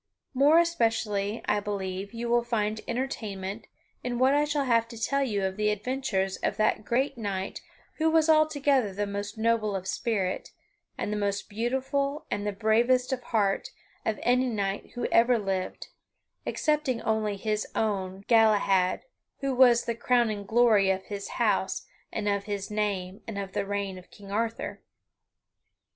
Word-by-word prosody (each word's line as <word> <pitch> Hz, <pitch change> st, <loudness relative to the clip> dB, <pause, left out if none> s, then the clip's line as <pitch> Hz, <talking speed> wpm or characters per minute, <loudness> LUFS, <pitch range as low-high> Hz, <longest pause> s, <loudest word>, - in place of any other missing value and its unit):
More 285 Hz, +5 st, +5 dB
especially, 225 Hz, -10 st, +1 dB
I 210 Hz, -, +2 dB
believe, 200 Hz, -1 st, -4 dB
you 235 Hz, 0 st, -4 dB
will 240 Hz, 0 st, +3 dB
find 215 Hz, -2 st, -1 dB
entertainment 215 Hz, -5 st, -4 dB, 0.4 s
in 245 Hz, -1 st, -2 dB
what 260 Hz, +2 st, +4 dB
I 295 Hz, +1 st, +3 dB
shall 295 Hz, -1 st, 0 dB
have 230 Hz, -2 st, +3 dB
to 230 Hz, -1 st, -10 dB
tell 275 Hz, +5 st, +1 dB
you 210 Hz, -7 st, 0 dB
of 190 Hz, +1 st, -3 dB
the 210 Hz, 0 st, +2 dB
adventures 210 Hz, -3 st, -1 dB
of -, -, -2 dB
that 215 Hz, 0 st, +2 dB
great 260 Hz, +3 st, 0 dB
knight 195 Hz, -3 st, -3 dB, 0.4 s
who 320 Hz, 0 st, +3 dB
was 320 Hz, -1 st, +4 dB
altogether 285 Hz, -8 st, +3 dB
the 205 Hz, +1 st, 0 dB
most 200 Hz, +1 st, -5 dB
noble 220 Hz, -2 st, +1 dB
of 190 Hz, -1 st, -4 dB
spirit, 195 Hz, -3 st, -1 dB, 0.5 s
and 210 Hz, -, -2 dB
the -, -, -1 dB
most 200 Hz, -1 st, -1 dB
beautiful, 265 Hz, +6 st, -1 dB
and 205 Hz, 0 st, -2 dB
the -, -, +1 dB
bravest 240 Hz, +5 st, +2 dB
of 255 Hz, -, -3 dB
heart, 205 Hz, -4 st, +1 dB, 0.3 s
of 220 Hz, -2 st, -1 dB
any 250 Hz, +1 st, +3 dB
knight 200 Hz, -3 st, -3 dB
who 245 Hz, -, -2 dB
ever 235 Hz, +1 st, +5 dB
lived 195 Hz, -3 st, -3 dB, 0.6 s
excepting 300 Hz, -5 st, 0 dB
only 215 Hz, -2 st, 0 dB
his 215 Hz, +1 st, -1 dB
own 200 Hz, -4 st, 0 dB
son, 190 Hz, +1 st, -13 dB
Galahad, 205 Hz, -5 st, +4 dB, 0.4 s
who 275 Hz, -1 st, 0 dB
was 245 Hz, -2 st, +5 dB
the 235 Hz, -, 0 dB
crowning 230 Hz, -3 st, +1 dB
glory 220 Hz, -4 st, +4 dB
of 190 Hz, 0 st, 0 dB
his 200 Hz, -1 st, -6 dB
house 205 Hz, -5 st, +1 dB, 0.3 s
and 210 Hz, -2 st, -3 dB
of 200 Hz, -1 st, 0 dB
his 205 Hz, -1 st, -4 dB
name 200 Hz, -2 st, -2 dB
and 220 Hz, -3 st, -5 dB
of 195 Hz, -1 st, -4 dB
the 200 Hz, -, -1 dB
reign 200 Hz, -2 st, -3 dB
of 180 Hz, -, -17 dB
King 200 Hz, -1 st, -12 dB
Arthur. 225 Hz, +2 st, -2 dB
220 Hz, 165 wpm, -28 LUFS, 200-245 Hz, 0.6 s, More